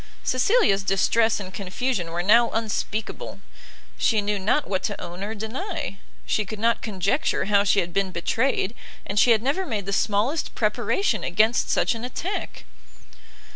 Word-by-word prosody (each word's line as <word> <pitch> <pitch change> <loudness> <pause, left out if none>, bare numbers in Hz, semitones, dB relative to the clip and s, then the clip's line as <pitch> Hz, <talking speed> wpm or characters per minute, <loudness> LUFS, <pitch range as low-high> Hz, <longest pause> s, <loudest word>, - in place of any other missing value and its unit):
Cecilia's 255 - +3
distress 215 +4 +2
and 190 -2 -8
confusion 195 0 -2
were 170 +1 -2
now 230 +5 +5
unspeakable; 220 -1 -3 0.6
she 220 - +3
knew 205 0 -1
not 220 +10 +1
what 190 -2 -1
to - - -3
own 175 +1 -7
or 215 +2 -4
deny, 260 - -5 0.3
she 215 - +1
could 215 +2 -7
not 230 +2 +1
conjecture 200 - 0
how 200 0 +3
she 200 0 +3
had 175 0 -5
been 195 0 +1
betrayed, 225 +4 0 0.3
and 200 +1 0
she 245 - +5
had 225 -1 +4
never 285 +9 0
made 215 - -3
the 195 - -3
smallest 215 +10 0
preparation 220 - 0
against 215 +7 +2
such - - +2
an 230 0 -7
attack. 340 +10 -4
215 Hz, 160 wpm, -24 LUFS, 195-240 Hz, 0.6 s, now